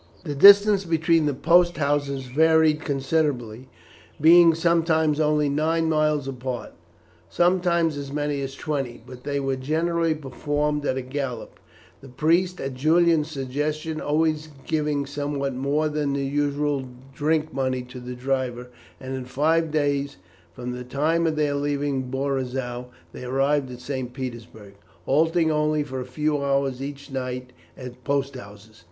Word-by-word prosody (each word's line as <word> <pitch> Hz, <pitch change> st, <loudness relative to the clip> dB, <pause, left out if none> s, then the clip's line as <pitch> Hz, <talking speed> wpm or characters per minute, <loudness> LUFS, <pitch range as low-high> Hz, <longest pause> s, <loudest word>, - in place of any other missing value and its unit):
The 150 Hz, -5 st, -4 dB
distance 200 Hz, +5 st, +7 dB
between 165 Hz, -2 st, +2 dB
the 145 Hz, -, 0 dB
post 175 Hz, +4 st, +3 dB
houses 140 Hz, -2 st, 0 dB
varied 160 Hz, +3 st, +3 dB
considerably, 135 Hz, -5 st, -1 dB, 0.5 s
being 165 Hz, +1 st, +7 dB
sometimes 165 Hz, -2 st, +2 dB
only 150 Hz, -1 st, +2 dB
nine 160 Hz, +3 st, +1 dB
miles 155 Hz, -3 st, +1 dB
apart, 130 Hz, -2 st, -5 dB, 0.6 s
sometimes 175 Hz, -3 st, +2 dB
as 140 Hz, -1 st, -6 dB
many 145 Hz, -1 st, -2 dB
as 135 Hz, 0 st, -5 dB
twenty, 135 Hz, -7 st, -4 dB
but 125 Hz, 0 st, -12 dB
they 140 Hz, -1 st, -1 dB
were 135 Hz, -1 st, -1 dB
generally 165 Hz, +4 st, 0 dB
performed 145 Hz, +1 st, -2 dB
at 130 Hz, -, 0 dB
a 130 Hz, -, -3 dB
gallop, 130 Hz, -3 st, -5 dB, 0.4 s
the 135 Hz, -, -12 dB
priest, 170 Hz, +7 st, +1 dB
at 135 Hz, 0 st, -4 dB
Julian's 160 Hz, +3 st, +3 dB
suggestion, 150 Hz, +3 st, -3 dB
always 155 Hz, +1 st, 0 dB, 0.2 s
giving 150 Hz, -2 st, -1 dB
somewhat 140 Hz, -1 st, -3 dB
more 140 Hz, +4 st, 0 dB
than 150 Hz, -2 st, -1 dB
the 140 Hz, 0 st, -1 dB
usual 145 Hz, 0 st, -1 dB, 0.3 s
drink 155 Hz, +1 st, 0 dB
money 130 Hz, -1 st, -1 dB
to 125 Hz, +1 st, -10 dB
the 125 Hz, 0 st, -7 dB
driver, 125 Hz, -1 st, -2 dB, 0.3 s
and 130 Hz, 0 st, -6 dB
in 130 Hz, -1 st, -5 dB
five 160 Hz, +5 st, +1 dB
days 145 Hz, -4 st, -1 dB, 0.4 s
from 125 Hz, 0 st, -5 dB
the 125 Hz, 0 st, -6 dB
time 155 Hz, +6 st, 0 dB
of 160 Hz, -, 0 dB
their 150 Hz, -1 st, +1 dB
leaving 140 Hz, -2 st, -1 dB
Borizow 130 Hz, -2 st, -3 dB, 0.3 s
they -, -, -8 dB
arrived 135 Hz, +2 st, 0 dB
at 125 Hz, -, -9 dB
St. 130 Hz, -1 st, -4 dB
Petersburg, 115 Hz, -5 st, -8 dB, 0.3 s
halting 160 Hz, +3 st, +2 dB
only 150 Hz, 0 st, +1 dB
for 130 Hz, -2 st, -6 dB
a -, -, -6 dB
few 145 Hz, +3 st, -1 dB
hours 135 Hz, -2 st, 0 dB
each 140 Hz, +1 st, -7 dB
night 125 Hz, -1 st, -5 dB, 0.2 s
at 125 Hz, 0 st, -10 dB
post 140 Hz, 0 st, -1 dB
houses. 105 Hz, -1 st, -12 dB
145 Hz, 145 wpm, -24 LUFS, 130-155 Hz, 0.6 s, distance